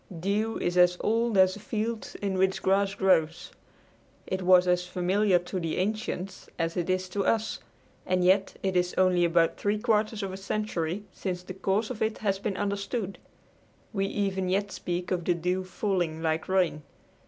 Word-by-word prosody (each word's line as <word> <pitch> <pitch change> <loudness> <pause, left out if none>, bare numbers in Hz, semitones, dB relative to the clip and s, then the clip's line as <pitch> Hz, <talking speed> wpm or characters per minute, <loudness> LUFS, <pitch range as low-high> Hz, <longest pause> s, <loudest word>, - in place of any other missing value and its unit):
Dew 210 +5 0
is 175 +1 0
as 180 0 +5
old 230 -1 +1
as 185 0 +6
the 205 - -8
fields 220 +2 -3
in 200 -2 -2
which 190 0 +1
grass 195 +1 +2
grows. 170 -5 +2 0.7
It 185 0 -3
was 180 0 +5
as 180 0 +2
familiar 185 +2 +2
to 180 +2 -4
the 165 -2 -2
ancients 195 -1 -3
as 165 -1 -1
it 175 0 -2
is 185 0 0
to 200 +1 -1
us, 220 +1 0 0.4
and 185 0 +1
yet 190 +1 +3
it 190 -1 0
is 180 0 +1
only 185 -1 +4
about 170 -1 +3
three 205 +1 0
quarters 215 -1 0
of 190 -1 -4
a - - -5
century 195 -2 -2
since 180 -2 -4
the 185 - -7
cause 195 +4 0
of 235 - -7
it 220 0 0
has 195 -3 -1
been 200 -1 -3
understood. 200 0 -3 0.7
We 195 -1 0
even 195 -2 -1
yet 200 +2 0
speak 175 0 -4
of 180 -2 0
the 175 +1 +1
dew 180 +2 -1
"falling" 180 -4 -2
like 160 +2 -1
rain. 180 -5 +2
190 Hz, 180 wpm, -28 LUFS, 180-205 Hz, 0.7 s, as